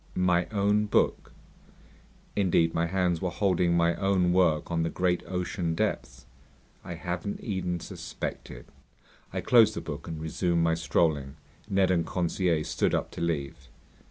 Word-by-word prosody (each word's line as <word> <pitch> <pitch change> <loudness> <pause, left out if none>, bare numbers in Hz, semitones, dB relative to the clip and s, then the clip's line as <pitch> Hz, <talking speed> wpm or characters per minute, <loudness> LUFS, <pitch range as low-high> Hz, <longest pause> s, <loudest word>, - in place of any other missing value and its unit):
"My 90 -1 +2
own 105 0 +1
book?" - - +1 1.0
Indeed, 85 -4 +2
my 85 +1 +1
hands 90 -2 0
were 90 - 0
holding 90 -1 +1
my 85 0 +3
own 95 -2 +2
work 90 -4 +2
on 85 -1 +1
the 80 - 0
great 90 0 0
ocean 90 -2 -2
depths. 60 -5 -2 0.6
I 85 - -6
hadn't 90 +4 -4
even 90 -4 -2
suspected. - - -7 0.7
I - - -3
closed 110 -3 +5
the - - -2
book 75 0 -7
and 80 -2 -5
resumed 85 +2 0
my 85 0 +3
strolling. 75 -4 0 0.3
Ned 95 -2 +3
and 85 -2 +2
Conseil 85 -2 0
stood 80 - 0
up - - -2
to - - -7
leave. 75 -4 -3
85 Hz, 150 wpm, -28 LUFS, 80-95 Hz, 1.0 s, closed